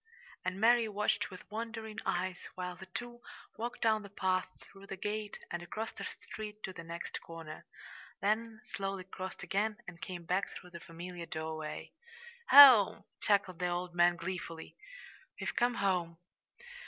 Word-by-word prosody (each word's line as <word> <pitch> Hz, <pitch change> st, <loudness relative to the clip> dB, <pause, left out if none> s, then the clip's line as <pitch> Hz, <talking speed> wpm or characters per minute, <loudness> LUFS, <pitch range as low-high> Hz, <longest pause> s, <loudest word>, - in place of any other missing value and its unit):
And 185 Hz, -, -2 dB
Mary 230 Hz, +1 st, +5 dB
watched 210 Hz, 0 st, 0 dB
with 185 Hz, -2 st, -10 dB
wondering 225 Hz, 0 st, -4 dB
eyes 180 Hz, +1 st, -1 dB
while 180 Hz, -1 st, -4 dB
the 190 Hz, +2 st, -11 dB
two 240 Hz, +5 st, -6 dB, 0.3 s
walked 240 Hz, +2 st, -4 dB
down 220 Hz, -1 st, +4 dB
the 200 Hz, -, -10 dB
path, 185 Hz, -1 st, +1 dB
through 195 Hz, 0 st, -15 dB
the 195 Hz, -, -5 dB
gate 210 Hz, +1 st, -3 dB
and 175 Hz, -, -2 dB
across 215 Hz, +6 st, -4 dB
the -, -, -7 dB, 0.2 s
street 215 Hz, -1 st, -7 dB
to 190 Hz, -, -4 dB
the 170 Hz, -, -8 dB
next 170 Hz, +1 st, -5 dB
corner, 165 Hz, -2 st, -9 dB, 0.5 s
then 220 Hz, +2 st, 0 dB
slowly 195 Hz, -1 st, -3 dB
crossed 185 Hz, 0 st, -7 dB
again 210 Hz, +2 st, 0 dB
and 180 Hz, -1 st, -9 dB
came 185 Hz, -2 st, -5 dB
back 185 Hz, +4 st, +1 dB
through 180 Hz, -, -10 dB
the 170 Hz, -, -8 dB
familiar 170 Hz, +1 st, -8 dB
doorway. 155 Hz, -1 st, -4 dB, 0.6 s
"Home!" 260 Hz, -8 st, +10 dB, 0.2 s
chuckled 200 Hz, -4 st, +2 dB
the 180 Hz, -, +1 dB
old 175 Hz, 0 st, -2 dB
man 175 Hz, 0 st, +5 dB
gleefully. 170 Hz, -2 st, -5 dB, 0.6 s
"We've -, -, -3 dB
come 240 Hz, 0 st, +3 dB
home!" 180 Hz, -5 st, 0 dB
190 Hz, 155 wpm, -33 LUFS, 175-215 Hz, 0.6 s, Home